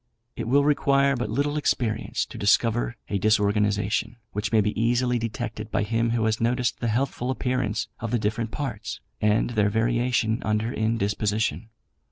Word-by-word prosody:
It - - -4
will 140 +4 +4
require 140 -1 +3
but 120 -4 -3
little 145 +6 0
experience 120 -7 0
to - - -11
discover 115 +3 +2
a 100 - -1
disorganisation, 105 +1 +1 0.2
which 105 +2 -3
may 110 - +4
be 105 0 +2
easily 120 +1 +2
detected 115 -1 -4
by 105 - 0
him 115 +2 0
who 115 -1 +1
has 110 0 0
noticed 120 0 0
the 120 - -1
healthful 125 +2 -1
appearance 125 -4 -1
of 115 - -4
the 120 - +1
different 110 +1 -1
parts 115 -5 -5 0.2
and 105 +2 +2
their 105 -3 +2
variation 115 +1 +1
under 110 +2 -1
indisposition. 110 0 -1
115 Hz, 160 wpm, -25 LUFS, 105-125 Hz, 0.2 s, will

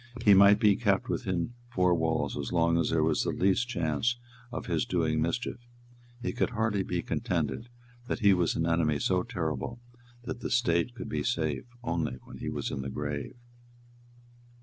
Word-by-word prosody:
He 105 - +8
might 100 +1 +7
be 105 -2 +5
kept 115 +1 +1
within 95 -2 -1 0.2
four 90 -6 +3
walls 80 -1 0
as 70 -1 -4
long 85 -1 +3
as - - +1
there 80 -1 +2
was 80 -1 +2
the - - 0
least 100 +6 +1
chance 85 +4 0 0.3
of 120 - -5
his 85 -4 0
doing 80 -3 0
mischief. 85 +12 -2 0.6
It - - -1
could 125 - 0
hardly 110 -2 0
be 90 -2 -2
contended 115 +2 -2 0.4
that - - -1
he 100 -2 +6
was 90 -3 +1
an 80 - 0
enemy 80 -3 +2
so 90 +5 +1
terrible 110 +2 -3 0.4
that 120 0 -5
the - - -4
State 120 -2 +1
could - - -6
be - - -2
safe 80 - -1 0.2
only 80 - -1
when - - -11
he - - -3
was - - -3
in 70 - -3
the 65 - -4
grave. 75 - -4
90 Hz, 180 wpm, -29 LUFS, 80-110 Hz, 0.6 s, He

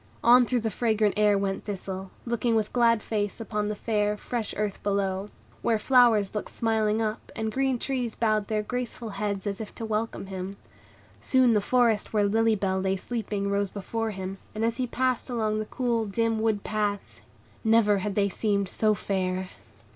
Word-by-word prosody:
On 245 +1 +7
through 250 -2 +1
the 220 0 -1
fragrant 215 -1 +1
air 210 -1 +4
went 195 -1 -2
Thistle, 190 -2 -5 0.2
looking 235 0 0
with 215 -1 0
glad 230 -3 +3
face 205 -1 -2
upon 210 -1 -2
the 210 - -2
fair, 210 -1 0
fresh 230 0 -3
earth 210 -1 -2
below, 195 -1 -1 0.3
where 230 -2 +2
flowers 230 -4 +4
looked 210 - -3
smiling 220 -1 +1
up, 215 0 -4
and 220 0 -2
green 265 +1 +1
trees 245 -3 -2
bowed 215 -2 +1
their 215 -1 0
graceful 245 0 -4
heads 200 -1 -3
as 200 +1 -3
if 215 - -8
to 225 - -5
welcome 220 -1 -2
him. 190 0 -5 0.6
Soon 255 -3 +4
the 210 - +3
forest 230 -2 +2
where 210 -1 +3
Lily 225 +2 +3
Bell 190 -2 0
lay 190 0 +1
sleeping 205 -1 -3
rose 200 0 +1
before 225 +3 -3
him, 190 -1 -5 0.2
and 220 +1 0
as 230 0 0
he 255 -1 -1
passed 255 +1 0
along 215 -3 0
the 215 - -2
cool, 235 -2 -1
dim 225 +2 0
wood 220 -2 0
paths, 210 -2 -2 0.4
never 220 -3 +4
had 195 +1 -3
they 200 -1 +3
seemed 200 -1 0
so 215 +1 +2
fair. 185 -2 -2
215 Hz, 185 wpm, -27 LUFS, 200-230 Hz, 0.6 s, On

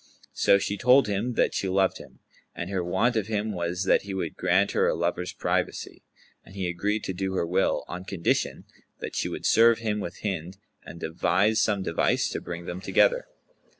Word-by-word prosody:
So 100 - +4
she 100 +1 -2
told 130 +3 +6
him 105 +5 -1
that - - +1
she 95 - -1
loved 95 0 +1
him, - - -14 0.3
and 85 +3 -5
her 95 -2 -1
want 100 +8 +1
of 110 -3 0
him 110 0 -1
was 90 -1 -2
that 95 - +3
he 100 -1 -6
would 90 -3 -3
grant 95 +3 +2
her - - +2
a - - +1
lover's 90 +1 -2
privacy; - - -2 0.4
and 95 - -16
he 95 -2 -2
agreed 100 +5 -1
to 95 - -3
do 95 +1 -3
her 90 - 0
will, 90 +3 0
on 90 +1 -7
condition 95 -4 -1 0.3
that - - -7
she - - -1
would - - -6
serve 115 0 +5
him 110 -2 -2
with 90 -3 -6
Hind 95 -2 -3 0.3
and 85 - -10
devise 95 +7 +1
some 100 -3 +1
device 85 -3 +1
to - - -4
bring 85 0 -7
them 90 +2 -5
together. - - +2
95 Hz, 200 wpm, -26 LUFS, 90-105 Hz, 0.4 s, told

